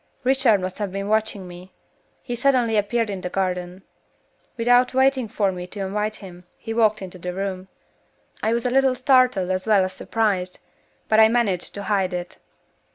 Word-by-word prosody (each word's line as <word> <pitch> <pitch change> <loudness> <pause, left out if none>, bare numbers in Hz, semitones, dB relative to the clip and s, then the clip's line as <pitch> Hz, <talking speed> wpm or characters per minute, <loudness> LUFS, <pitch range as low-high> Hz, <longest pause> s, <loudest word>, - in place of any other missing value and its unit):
"Richard 255 -5 +3
must 185 +2 -5
have 205 -3 -3
been 195 +1 -4
watching 215 -3 -1
me. 180 +1 -12 0.5
He 245 - -5
suddenly 245 -3 +2
appeared 215 +1 0
in 190 -2 -5
the 180 - -4
garden. 180 0 -3 0.7
Without 245 +2 +3
waiting 265 -2 +2
for 205 -2 0
me 180 -1 -7
to 200 +2 -7
invite 210 +3 -2
him, 180 -4 -12
he 225 - -6
walked 215 -3 +2
into 185 -1 -9
the 180 +1 -5
room. 190 -1 -4 0.7
I 220 - +1
was 235 +1 -1
a 250 - +1
little 265 0 +3
startled 255 -8 +3
as 185 +2 -2
well 205 -3 +4
as 185 0 -3
surprised, 190 -3 -1 0.5
but 220 - +3
I 220 - +8
managed 220 -6 0
to 200 - -4
hide 195 -3 0
it. 175 0 -6
205 Hz, 180 wpm, -22 LUFS, 185-235 Hz, 0.7 s, I